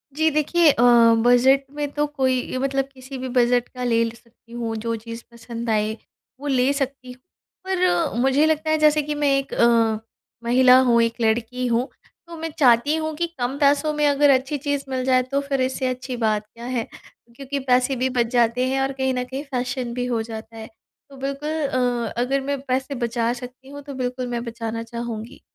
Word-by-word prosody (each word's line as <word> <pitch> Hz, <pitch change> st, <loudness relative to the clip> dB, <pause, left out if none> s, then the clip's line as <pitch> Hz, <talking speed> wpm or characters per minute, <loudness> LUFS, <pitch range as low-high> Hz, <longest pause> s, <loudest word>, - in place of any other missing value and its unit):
जी 315 Hz, +1 st, +3 dB
देखिए 305 Hz, +2 st, +3 dB
अ, 240 Hz, -, +1 dB, 0.4 s
बजट 260 Hz, +3 st, +5 dB
में 295 Hz, -1 st, -2 dB
तो 295 Hz, +1 st, 0 dB
कोई 260 Hz, -3 st, -1 dB
मतलब 270 Hz, +1 st, 0 dB
किसी 265 Hz, +1 st, -9 dB
भी 260 Hz, 0 st, -5 dB
बजट 245 Hz, 0 st, +3 dB
का 250 Hz, -1 st, -7 dB
ले 230 Hz, -2 st, +2 dB
सकती 235 Hz, 0 st, -24 dB
हूँ 235 Hz, -1 st, -4 dB
जो 230 Hz, 0 st, 0 dB
चीज़ 230 Hz, 0 st, -8 dB
पसंद 235 Hz, 0 st, -7 dB
आए 215 Hz, 0 st, +1 dB, 0.5 s
वो 290 Hz, -, -6 dB
ले 260 Hz, -1 st, +2 dB
सकती 270 Hz, -2 st, -4 dB
हूँ। 250 Hz, 0 st, -15 dB, 0.5 s
पर 360 Hz, -4 st, +1 dB
मुझे 270 Hz, +3 st, +3 dB
लगता 315 Hz, 0 st, 0 dB
है 315 Hz, -, +3 dB
जैसे 305 Hz, 0 st, +4 dB
कि 295 Hz, +1 st, -4 dB
मैं 290 Hz, -1 st, +1 dB
एक 275 Hz, 0 st, -4 dB
अ, 230 Hz, -2 st, +3 dB, 0.4 s
महिला 250 Hz, +2 st, +6 dB
हूँ, 240 Hz, -3 st, +4 dB
एक 230 Hz, +1 st, -1 dB
लड़की 230 Hz, +3 st, 0 dB
हूँ 240 Hz, +3 st, +1 dB, 0.4 s
तो 340 Hz, -, -9 dB
मैं 325 Hz, +1 st, -4 dB
चाहती 255 Hz, +2 st, +4 dB
हूँ 315 Hz, 0 st, -2 dB
कि 340 Hz, +3 st, -1 dB
कम 250 Hz, +3 st, -2 dB
पैसों 290 Hz, +1 st, +3 dB
में 300 Hz, 0 st, +1 dB
अगर 285 Hz, 0 st, +4 dB
अच्छी 270 Hz, +2 st, +2 dB
चीज़ 285 Hz, 0 st, -2 dB
मिल 260 Hz, -1 st, -2 dB
जाए 255 Hz, -1 st, +4 dB
तो 280 Hz, -, +2 dB
फिर 280 Hz, -1 st, -2 dB
इससे 260 Hz, 0 st, -1 dB
अच्छी 255 Hz, 0 st, -4 dB
बात 215 Hz, -2 st, 0 dB
क्या 235 Hz, +2 st, -12 dB
है 235 Hz, -, 0 dB, 0.5 s
क्योंकि 275 Hz, +2 st, -4 dB
पैसे 255 Hz, 0 st, +2 dB
भी 255 Hz, +1 st, 0 dB
बच 240 Hz, -, +3 dB
जाते 240 Hz, +1 st, +2 dB
हैं 270 Hz, +1 st, 0 dB
और 270 Hz, -, 0 dB
कहीं 265 Hz, -1 st, -1 dB
न 250 Hz, -1 st, -1 dB
कहीं 265 Hz, +3 st, -6 dB
फ़ेेशन 250 Hz, -3 st, -3 dB
भी 245 Hz, 0 st, -2 dB
हो 240 Hz, -2 st, -1 dB
जाता 220 Hz, 0 st, -8 dB
है। 220 Hz, 0 st, -8 dB, 0.4 s
तो 275 Hz, -, -13 dB
बिल्कुल 275 Hz, +2 st, -4 dB, 0.2 s
अ, 245 Hz, -3 st, -1 dB
अगर 270 Hz, +3 st, 0 dB
मैं 280 Hz, +1 st, -2 dB
पैसे 265 Hz, +1 st, -2 dB
बचा 235 Hz, 0 st, -1 dB
सकती 250 Hz, +2 st, -10 dB
हूँ 285 Hz, +1 st, -9 dB
तो 280 Hz, 0 st, -8 dB
बिल्कुल 255 Hz, -1 st, -3 dB
मैं 240 Hz, -1 st, -3 dB
बचाना 230 Hz, -1 st, -5 dB
चाहूँगी। 235 Hz, 0 st, -7 dB
255 Hz, 200 wpm, -22 LUFS, 235-280 Hz, 0.5 s, महिला